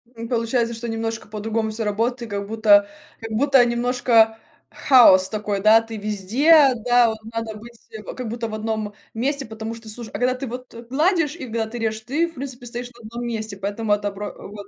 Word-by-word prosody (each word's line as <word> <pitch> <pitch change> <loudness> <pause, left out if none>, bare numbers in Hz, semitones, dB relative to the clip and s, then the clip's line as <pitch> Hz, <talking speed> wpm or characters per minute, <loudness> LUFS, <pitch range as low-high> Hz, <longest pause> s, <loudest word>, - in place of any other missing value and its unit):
М, 230 0 -6
получается, 235 0 0
что 230 +1 -6
немножко 225 0 -4
по-другому 220 +1 -2
всё 225 +1 -2
работает, 230 +2 -2
как 200 0 -3
будто 205 -2 +4 0.3
как 225 -1 -7
будто 270 +2 +4
немножко 235 -2 +2 0.3
хаос 195 -9 +6
такой, 210 -2 -3
да, 220 +2 +6
ты 225 -1 -8
везде, 250 - +4
да, 240 0 +3
вот 220 - -4 0.2
надо 225 -1 -4
быть 235 +2 -13 0.4
как 250 -3 -5
будто 230 0 -4
в 215 - -8
одном 215 -1 -3 0.2
месте, 275 +4 -1
потому 220 +1 -6
что 225 -1 -11
слушай 220 +1 -6
а - - -21
когда 250 +1 +2
ты 260 +1 -6
вот 250 +2 -8 0.2
гладишь 320 +2 +1
и 285 - -7
когда 225 -1 -2
ты 240 +2 -7
режешь, 220 -1 -2
ты, 295 +9 0
в 330 - -14
принципе, 255 -2 -7
стоишь 245 +1 -6
на 240 - -19
одном 235 +2 -6
месте, 220 -3 -4
поэтому 205 +2 -1
это 205 0 -1
бро 205 +1 -6 0.2
вот. 205 -1 -10
225 Hz, 200 wpm, -22 LUFS, 215-245 Hz, 0.4 s, хаос